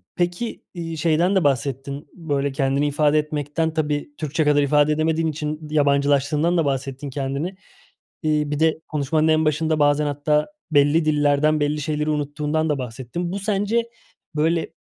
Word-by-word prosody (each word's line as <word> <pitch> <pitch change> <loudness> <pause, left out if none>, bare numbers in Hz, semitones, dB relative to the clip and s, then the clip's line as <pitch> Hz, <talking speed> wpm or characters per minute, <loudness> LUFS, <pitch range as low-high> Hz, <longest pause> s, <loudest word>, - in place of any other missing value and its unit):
peki, 175 +6 -2
iii, 165 -2 -5
şeyden 170 +4 +2
de 190 - +3
bahsettin, 140 +1 -1
böyle, 145 -5 -2
kendini 135 +2 +1
ifade 150 +1 +2
etmekten, 150 +1 -2
tabii 150 -2 -2
Türkçe 155 +1 -1
kadar 150 -1 +3
ifade 145 +1 +3
edemediğin 160 +1 +1
için 150 0 -3
yabancılaştığından 145 +3 +2
da 165 - +2
bahsettin 135 0 -3
kendini. 140 +6 -3 0.7
İii, 150 -1 +1
bir 150 - -1
de 160 0 +2
konuşmanın 155 +1 0
en 155 0 +3
başında 155 +1 +1
bazen 145 0 +3
hatta 145 +1 +1 0.2
belli 145 +2 +4
dillerden 150 0 +2
belli 150 +1 0
şeyleri 150 +1 -1
unuttuğundan 150 +1 -1
da 150 - +1
bahsettin. 130 +8 -5
Bu 200 - -2
sence, 210 +3 0 0.5
böyle, 160 +2 0
150 Hz, 150 wpm, -22 LUFS, 145-160 Hz, 0.7 s, belli